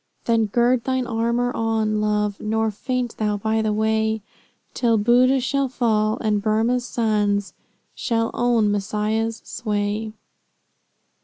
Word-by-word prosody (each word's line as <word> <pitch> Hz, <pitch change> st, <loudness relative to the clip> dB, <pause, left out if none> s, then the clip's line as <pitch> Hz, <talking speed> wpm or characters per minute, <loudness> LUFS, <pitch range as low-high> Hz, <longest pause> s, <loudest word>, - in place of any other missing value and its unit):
Then 225 Hz, -2 st, +2 dB
gird 240 Hz, +3 st, +2 dB
thine 260 Hz, -1 st, 0 dB
armor 235 Hz, +1 st, 0 dB
on, 220 Hz, -1 st, 0 dB
Love, 210 Hz, -1 st, 0 dB
Nor 220 Hz, +1 st, 0 dB
faint 250 Hz, +3 st, -3 dB
thou 210 Hz, -1 st, 0 dB
by 220 Hz, +2 st, 0 dB
the 215 Hz, -1 st, 0 dB
way, 220 Hz, 0 st, 0 dB, 0.5 s
Till 230 Hz, -3 st, +2 dB
Boodh 250 Hz, +5 st, +4 dB
shall 275 Hz, +1 st, 0 dB
fall, 220 Hz, -3 st, +1 dB
and 210 Hz, -2 st, +1 dB
Burmah's 230 Hz, +4 st, +1 dB
sons 210 Hz, -4 st, 0 dB, 0.4 s
Shall 230 Hz, -2 st, -1 dB
own 235 Hz, -4 st, +2 dB
Messiah's 215 Hz, +2 st, -1 dB
sway." 210 Hz, 0 st, -2 dB
220 Hz, 125 wpm, -22 LUFS, 215-240 Hz, 0.5 s, Boodh